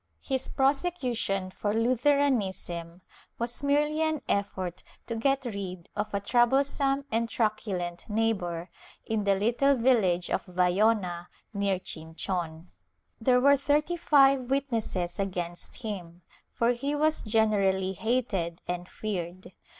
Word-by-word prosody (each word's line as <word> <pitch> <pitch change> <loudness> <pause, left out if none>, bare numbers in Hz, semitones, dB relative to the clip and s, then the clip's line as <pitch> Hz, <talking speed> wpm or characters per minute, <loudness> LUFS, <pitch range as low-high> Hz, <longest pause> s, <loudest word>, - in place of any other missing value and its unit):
His 265 -1 -1
prosecution 265 - 0
for 205 +2 -2
Lutheranism 225 -9 +1 0.3
was 235 +3 -2
merely 295 +2 +2
an 315 -2 0
effort 185 -3 -2 0.2
to 230 - -4
get 270 +4 +1
rid 190 -6 -5
of 210 +1 -2
a 200 - 0
troublesome 270 +5 +2
and 230 +1 0
truculent 205 -7 -2
neighbor, 190 -6 -1 0.3
in 220 -2 -1
the 200 -1 +4
little 240 +7 +3
village 215 -9 +2
of - - 0
Vayona, 180 0 +1 0.3
near 200 -2 +1
Chinchon. 165 0 -5 0.5
There 250 +2 +4
were 280 +2 +6
thirty 295 +5 +1
five 275 -6 +4
witnesses 225 -10 -1
against 180 +3 -4
him, 180 -5 -6 0.3
for 235 +1 +2
he 275 +4 -2
was 310 +1 +2
generally 200 -4 +2
hated 195 -6 -1
and 180 0 -4
feared. 185 -3 -5
215 Hz, 120 wpm, -28 LUFS, 185-265 Hz, 0.5 s, were